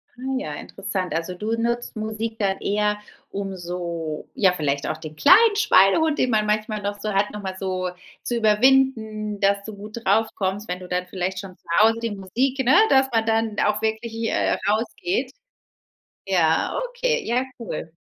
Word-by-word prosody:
Ah 260 +2 -4
ja, 150 - -5
interessant, 190 -2 -4
also 170 +3 -3
du 215 +4 -4
nutzt 235 0 -2
Musik 220 +1 -4
dann 195 -1 +1
eher, 210 0 0 0.3
um 195 -1 -4
so 170 -3 -5
ja, 190 -3 +4
vielleicht 145 -4 -1
auch 155 - -2
den 155 -1 -9
kleinen 415 - +6
Schweinehund, 310 - +4
den 255 - +1
man 215 -1 +2
manchmal 215 0 -1
noch 205 +1 -3
so 210 -1 -3
hat, 200 +1 +2
noch 210 - -7
mal 190 -1 -4
so 185 -1 -2 0.3
zu 240 - -2
überwinden, 220 -2 +2
dass 200 0 +2
du 215 -1 -8
gut 210 +3 -9
drauf 220 +3 +3
kommst, 195 +2 -2
wenn 180 +1 -3
du 180 - -10
dann 180 0 -1
vielleicht 185 0 -3
schon 190 -2 -9
zu - - -42
Hause 225 +1 +5
die 230 -2 -2
Musik, 245 +8 -1
ne, 260 - +5
dass 265 0 +5
man 225 -1 +2
dann 225 -1 +1
auch 210 0 +1
wirklich, 220 +1 -2
äh, - - +1
rausgeht. 230 - -1 0.9
Ja, 170 - +2
okay, 485 -2 0
ja 245 +2 +1 0.2
cool. 165 -7 -6
210 Hz, 180 wpm, -23 LUFS, 185-225 Hz, 0.9 s, kleinen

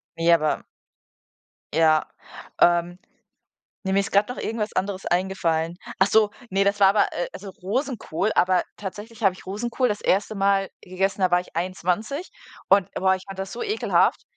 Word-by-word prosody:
Ne, 165 +1 +4
aber 155 -2 +1 1.1
ja, 155 0 +3 0.5
ähm, 175 +1 +3 0.9
ne, 190 - -1
mir 195 - +4
ist 200 - -4
grad 200 +3 +3
noch 250 - -5
irgendwas 220 -1 -3
anderes 190 0 -2
eingefallen. 175 -2 0 0.2
Ach 190 - +5
so, 215 0 +4 0.2
ne, 195 +1 +2
das 200 +1 +1
war 195 - +7
aber 205 +1 +2
äh, 175 - -2
also 195 +1 -8
Rosenkohl, 215 - -1
aber 180 0 +3
tatsächlich 210 +4 -8
habe 195 -3 +4
ich - - -15
Rosenkohl 235 +5 -1
das 210 -1 -2
1. 200 +3 +1
Mal 195 -1 +2
gegessen, 195 +2 -2
da 185 - +3
war 180 0 +4
ich 180 - -14
21 185 - -2 0.4
und, 195 0 +4
boah, 190 0 +3
ich 185 - -6
fand 195 -1 -9
das 195 0 -5
so - - -5
ekelhaft 430 0 +1
195 Hz, 170 wpm, -24 LUFS, 180-205 Hz, 1.1 s, war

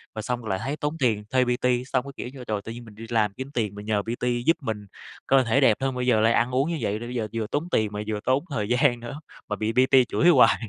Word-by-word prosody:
Rồi 110 - -3
xong 125 +1 -2
rồi 110 - -7
lại 95 - -1
thấy 135 +4 -2
tốn 150 +2 -3
tiền 110 -6 +1
thuê 130 +1 +3
PT, 125 0 +1
xong 130 -2 0
cái, 140 - -7
kiểu - - -5
như, 130 -2 -9
trời, 105 -2 -1
tự 115 - -8
nhiên 120 +1 -9
mình 110 -2 -14
đi 115 +2 -9
làm 110 -4 +1
kiếm 130 +5 -7
tiền 105 -6 -1
mình 105 0 -8
nhờ 105 -1 +1
PT 120 +2 -2
giúp 165 - +4
mình 110 -5 -4 0.4
cơ 135 -1 +5
thể 125 +4 +2
đẹp 115 -6 +5
hơn, 135 -1 -1
bây 125 0 -2
giờ 115 -4 +4
lại 115 +1 +4
ăn 120 +2 +2
uống 135 +5 +1
như 170 - -1
vậy, 105 +2 -1
rồi 120 - -6
bây 125 - -6
giờ 110 -3 -1
vừa 115 -2 -2
tốn 150 +9 -2
tiền 110 -1 +2
mà 105 - -4
vừa 110 -1 -2
tốn 130 +2 +2
thời 105 -7 -2
gian 120 0 +3
nữa, 120 +5 -7 0.3
mà 105 - -2
bị 110 +2 -1
PT 130 +1 +5
chửi 175 - +4
hoài. 140 -8 +6
120 Hz, 305 wpm, -25 LUFS, 110-130 Hz, 0.4 s, hoài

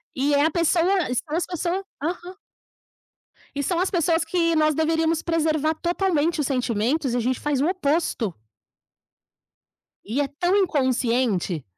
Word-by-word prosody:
E 280 +2 +1
é 285 +1 +4
a 320 - +2
pessoa 345 +2 +2
e 250 - -2
são 295 +5 -3
as 345 - 0
pessoa 355 +2 -2 0.2
Aham. 355 +4 -4 1.2
E 285 - -1
são 345 +3 0
as 370 - +1
pessoas 335 -2 +1
que 335 0 +1
nós 310 -1 +3
deveríamos 320 +1 +1
preservar 315 -2 0
totalmente 340 -2 0
os 280 - -1
sentimentos, 250 +1 0
e - - +1
a - - +1
gente 250 +2 -1
faz 290 -3 -1
o 295 - +2
oposto. 310 - 0 1.7
E 235 +8 -1
é 285 - 0
tão 350 +7 0
inconsciente. 250 - +1
310 Hz, 155 wpm, -23 LUFS, 270-345 Hz, 1.7 s, é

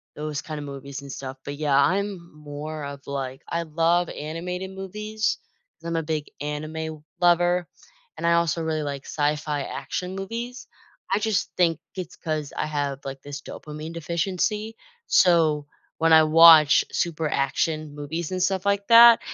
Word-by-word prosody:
those 150 -2 -4
kinda 155 -2 -6
movies 140 0 -7
and 140 - -8
stuff, 130 +1 -7
but, 145 - -5
yeah, 145 -3 +2
I'm 195 +7 +2 0.2
more 150 +1 -7
of, 140 -1 -8
like 135 -2 -4
I 170 0 -1
love 165 +2 +1
animated 180 +5 -5
movies, 210 +3 -3 0.4
'cause 165 - -9
I'm 170 - -2
a - - +1
big 155 -1 -3
anime 155 +1 -5 0.2
lover, 175 0 +3 0.5
and - - -4
I 170 - +4
also 170 -1 +1
really 160 -1 -1
like 140 -1 -5
sci-fi 150 -1 -1
action 180 +6 -5
movies. 230 +6 -5 0.5
I 200 - +3
just 215 -2 0
think 165 -3 +3 0.2
it's 185 -3 -6
'cause 155 -3 -3
I - - 0
have, 145 -2 -3
like, 135 0 -6
this 145 0 -7
dopamine 155 +2 -8
deficiency, 190 +6 -2 0.3
so, 160 -5 +4 0.3
when 165 0 +4
I 160 - +9
watch 155 -1 +8
super 160 -2 -1
action 155 +2 -1
movies 155 +4 -4
and 185 - -2
stuff 190 0 0
like 200 0 +1
that, 235 0 +9
160 Hz, 160 wpm, -25 LUFS, 150-180 Hz, 0.5 s, I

